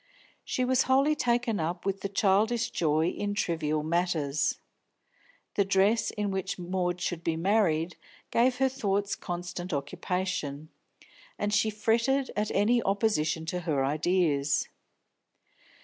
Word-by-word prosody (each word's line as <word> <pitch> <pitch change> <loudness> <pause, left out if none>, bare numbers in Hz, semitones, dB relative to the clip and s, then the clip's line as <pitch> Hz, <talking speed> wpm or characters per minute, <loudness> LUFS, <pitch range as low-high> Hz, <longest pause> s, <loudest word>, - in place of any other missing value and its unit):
She 255 - -1
was 260 0 +3
wholly 275 +3 +4
taken 240 -5 0
up 165 +3 -3
with 195 0 -2
childish 220 +4 +2
joy 160 0 +1
in 205 +1 -3
trivial 155 -5 -1
matters. 155 -4 0 1.0
The 200 - +3
dress 195 +4 +2
in 210 -2 -2
which 190 -1 -3
Maud 180 0 -2
should 175 -1 -3
be 165 -1 0
married 170 -2 +1 0.3
gave 250 +2 +3
her 265 +1 +3
thoughts 205 -6 -1
constant 175 0 -5
occupation, 155 -1 -3 0.7
and 205 0 -1
she 215 +2 +3
fretted 230 +6 +1
at 210 0 0
any 230 +4 +3
opposition 195 -7 0
to 180 +2 -2
her 150 -6 0
ideas. 150 -1 +1
190 Hz, 125 wpm, -28 LUFS, 165-215 Hz, 1.0 s, wholly